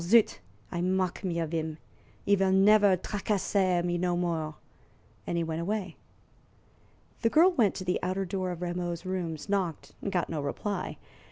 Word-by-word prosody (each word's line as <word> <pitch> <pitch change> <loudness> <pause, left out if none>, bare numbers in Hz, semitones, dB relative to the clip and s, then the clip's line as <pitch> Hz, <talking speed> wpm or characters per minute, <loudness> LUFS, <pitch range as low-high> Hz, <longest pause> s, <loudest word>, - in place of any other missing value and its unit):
Zut! 220 +5 +4 0.3
I 175 - -2
mock 185 +1 0
me 175 -3 -1
of 165 -1 -2
'im! 160 -1 -2 0.5
'E 205 - +3
vill 195 -1 +3
never 200 0 +6
tracasser 190 -2 0
me 175 0 0
no 175 0 +1
more." 165 -3 -1 0.7
And 170 - -1
he 170 - +1
went 160 0 -3
away. 190 -1 -2 1.3
The 230 - +3
girl 335 +8 +6
went 230 - +2
to - - -4
the 180 0 0
outer 185 +2 -1
door 185 0 -2
of 175 0 -4
Rameau's 175 0 -3
rooms, 175 -4 -3
knocked, 190 -6 -1
and 200 - -3
got 180 -3 0
no 155 -3 -3
reply. 195 +8 -3
180 Hz, 170 wpm, -29 LUFS, 170-195 Hz, 1.3 s, never